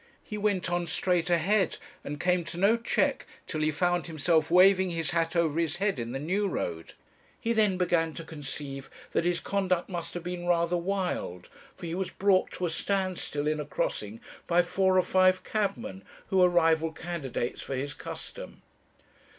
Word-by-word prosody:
He 210 - -6
went 205 -3 0
on 175 0 0
straight 180 -1 +1
ahead, 185 +4 +2 0.3
and 145 0 -5
came 180 -1 +2
to 170 - -6
no 200 +5 +4
check, 235 0 0 0.2
till 155 -3 -3
he 155 - +3
found 175 +3 0
himself 160 0 +1
waving 185 +1 +6
his 165 -2 -2
hat 165 0 0
over 165 -2 +2
his 165 -1 0
head 195 -5 0
in 115 0 -4
the 135 - -3
New 185 +9 0
Road. 85 - -4 0.5
He 230 - 0
then 210 -4 +3
began 165 -3 +1
to 165 - -6
conceive 140 -3 -6 0.2
that - - +1
his 175 0 +1
conduct 185 -3 0
must 170 -2 -5
have 175 - -4
been 175 0 -4
rather 170 0 +2
wild, 175 - -2 0.3
for - - -8
he 165 - -4
was 185 0 -2
brought 195 -1 +2
to 180 - -2
a - - 0
stand 190 +1 -1
still 145 0 -3
in 155 0 0
a 150 - -3
crossing 110 -6 -3 0.3
by 175 0 +4
four 185 +1 +2
or 185 - +5
five 185 0 +3
cabmen, 210 0 -2 0.3
who 190 - +1
were 180 -1 +6
rival 165 -2 +3
candidates 155 -7 -4
for 135 - -4
his 140 +3 -3
custom. - - -8
175 Hz, 185 wpm, -28 LUFS, 160-185 Hz, 0.5 s, waving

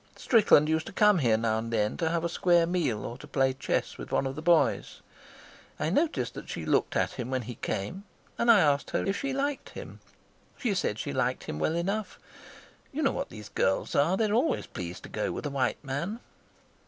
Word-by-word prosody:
Strickland 205 - +5
used 160 0 0
to - - -6
come 210 -3 +4
here 115 -6 +3
now 110 -1 0
and 115 +1 -5
then 105 -2 +1
to 165 - 0
have 170 0 -1
a - - +1
square 175 0 +3
meal 165 -11 -1
or 120 +2 -6
to 150 - -11
play 135 -2 +1
chess 130 - -2
with - - -8
one - - +1
of 135 - -2
the 155 - -6
boys. 170 0 +2 0.8
I 155 - 0
noticed 310 - 0
that - - -9
she - - -5
looked - - +1
at - - +1
him 125 -1 -5
when 130 -1 -1
he 120 +2 -6
came, 145 - -4 0.3
and 235 - 0
I 220 -4 +8
asked 145 -3 +2
her - - -1
if 195 - 0
she 275 - -2
liked 275 +1 -2
him. - - -9 0.6
She 235 -6 0
said 110 - -1
she 70 - -4
liked - - 0
him 75 - -5
well 155 - 0
enough. 195 +4 -2 0.7
You 310 +3 -2
know 275 - +3
what - - -4
these 105 -2 -10
girls 95 - 0
are; 165 +7 +3
they're 215 -1 +1
always 255 +8 +1
pleased 90 -3 -7
to - - -9
go - - -2
with - - -5
a 145 - -2
white 135 -1 -1
man." 150 - -3
160 Hz, 220 wpm, -28 LUFS, 125-200 Hz, 0.8 s, I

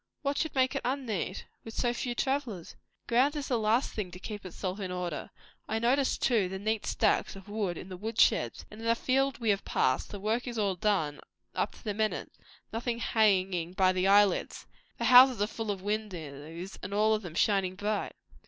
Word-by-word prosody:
"What 280 0 0
should 315 - -2
make 260 0 +3
it 275 - -2
unneat? 240 -8 -2 0.2
with 225 - -9
so 240 -1 +1
few 240 0 -3
travellers?" 260 - -2 0.3
"Ground 260 +5 +3
is 290 -2 -4
the 245 -3 +1
last 220 +4 +2
thing 210 -4 -3
to 180 - -10
keep 205 +1 -7
itself 185 +1 -5
in 190 -2 -4
order. 180 -4 -4 0.4
I 220 - 0
notice, 255 +4 +2
too, 220 -7 +2
the 190 - -4
neat 215 +2 -2
stacks - - +1
of 195 0 -12
wood 205 -5 -2
in 190 - -8
the 185 - -7
wood 220 +3 -4
sheds. 120 - +3
And 215 - -10
in 230 - -4
the 230 - +4
fields 270 +2 +1
we 225 -3 +2
have 200 0 -1
passed, 130 0 +1
the 205 - -7
work 220 +5 -1
is 240 -1 -4
all 200 -3 +1
done, 180 -6 0 0.3
up - - -1
to - - -17
the 210 -3 -2
minute; 215 +1 -1 0.4
nothing 235 +1 -2
hanging 190 -7 +2
by 185 0 +4
the 185 +1 +1
eyelids. 200 0 +3 0.3
The - - -2
houses 255 -1 +8
are 205 - +3
full 225 0 -5
of 195 -2 -3
windows, 175 -4 -5
and 195 +2 -5
all 215 +1 +4
of 215 - 0
them 175 -5 -8
shining 195 -1 +2
bright." 205 +1 -2
210 Hz, 210 wpm, -30 LUFS, 185-235 Hz, 0.4 s, houses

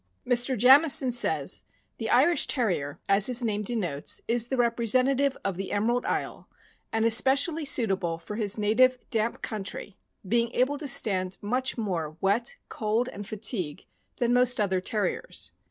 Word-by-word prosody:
Mr. 245 +1 +2
Jamison 265 +2 +5
says: 240 0 0 0.3
The 225 - -3
Irish 290 +5 +3
Terrier, 175 - -2
as 195 +1 +3
his 250 -1 +2
name 210 -2 -1
denotes, 195 -10 -2
is 235 0 0
the 265 - -2
representative 255 +3 +1
of 195 -3 -2
the 195 0 -5
Emerald 235 +4 0
Isle, - - -4 0.4
and 225 0 0
especially 275 +7 +2
suitable 195 -10 +1
for 210 +5 -8
his 210 -2 0
native 240 +5 +3
damp 225 0 -1
country, 205 -1 -6 0.3
being 235 +3 +1
able 280 +3 +1
to 300 - -5
stand 190 -7 +1
much 255 +6 -1
more 170 -8 -3
wet, 205 +5 0
cold, 225 +3 -1
and 205 -4 -9
fatigue 195 - -3 0.3
than 240 0 +1
most 250 -1 +2
other 190 -3 0
Terriers. 210 +2 -3
230 Hz, 150 wpm, -26 LUFS, 200-250 Hz, 0.4 s, Jamison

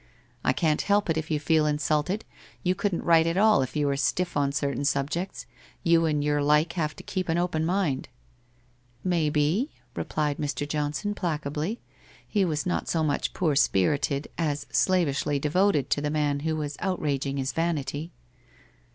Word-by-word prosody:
I - - +3
can't 155 -3 +1
help 205 -3 +2
it 160 - 0
if 160 0 -3
you 155 -2 +1
feel 155 0 +2
insulted, 150 +6 0 0.4
you 180 - +2
couldn't 190 -1 -1
write 165 -1 +5
at 165 +2 0
all 215 -6 +5
if 130 +1 -4
you 150 -1 +1
were 140 -1 +1
stiff 175 +5 0
on 140 -1 +2
cer 140 0 -1
tain 140 - -3
subjects, 145 +6 -1 0.4
you 165 -1 +4
and 150 -2 0
your 145 0 +1
like 150 +3 +3
have 155 -4 -2
to - - -11
keep 185 -2 -3
an 165 - +2
open 175 -3 0
mind.' 175 -8 0 0.5
' 125 0 -36 0.2
Maybe 155 - +1
?' - - -36
replied 150 -2 -1
Mr. 145 0 -2
Johnson 150 +7 -2
placably, 155 +2 -2 0.5
he 205 -3 +1
was 155 -4 -1
not 180 - -1
so 165 -2 +1
much 145 -2 0
poor 160 -6 +1
spirited, 140 +4 +2
as 150 -3 -1
slavishly 150 -6 +2
devoted 155 +1 +1
to 145 - +2
the 150 - -1
man 145 -2 0
who 160 +2 -1
was 150 -2 -4
outraging 140 -7 -1
his 135 0 -2
vanity. 160 -1 -2
150 Hz, 175 wpm, -27 LUFS, 145-170 Hz, 0.5 s, write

